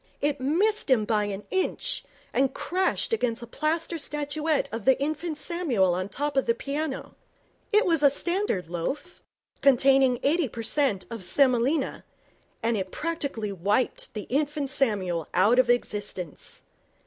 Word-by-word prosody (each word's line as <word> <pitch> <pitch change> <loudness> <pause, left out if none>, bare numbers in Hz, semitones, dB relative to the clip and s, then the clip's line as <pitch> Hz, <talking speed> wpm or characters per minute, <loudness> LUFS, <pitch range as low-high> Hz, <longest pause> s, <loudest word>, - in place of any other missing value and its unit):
It 290 -2 -1
missed 385 +11 +1
him 235 -5 +4
by 210 -1 +1
an 205 0 -5
inch, 390 +6 -1 0.3
and 265 0 +1
crashed 375 +5 0
against 245 - 0
a - - -5
plaster 320 +6 -2
statuette 295 0 -1
of 225 -1 -4
the 265 - +5
Infant 310 +2 -2
Samuel 270 - +1
on 185 +2 -2
the - - -21
top 290 +1 -2
of 270 - +1
the 230 - +3
piano. 285 +2 -4 0.6
It 425 +1 +4
was 330 -4 +2
a 285 - +7
standard 345 - 0
loaf, 220 - -4 0.4
containing 270 -1 +5
eighty 305 -1 +2
per 230 0 -6
cent 230 -5 +1
of 230 -4 -5
semolina, 260 - +2 0.6
and 230 0 +2
it 190 -2 -2
practically 280 -10 -3
wiped 205 +7 0
the 210 - -3
Infant 290 +1 -1
Samuel 195 - 0
out 215 +7 +5
of 255 -1 +4
existence. 205 -8 -2
270 Hz, 150 wpm, -26 LUFS, 220-305 Hz, 0.6 s, a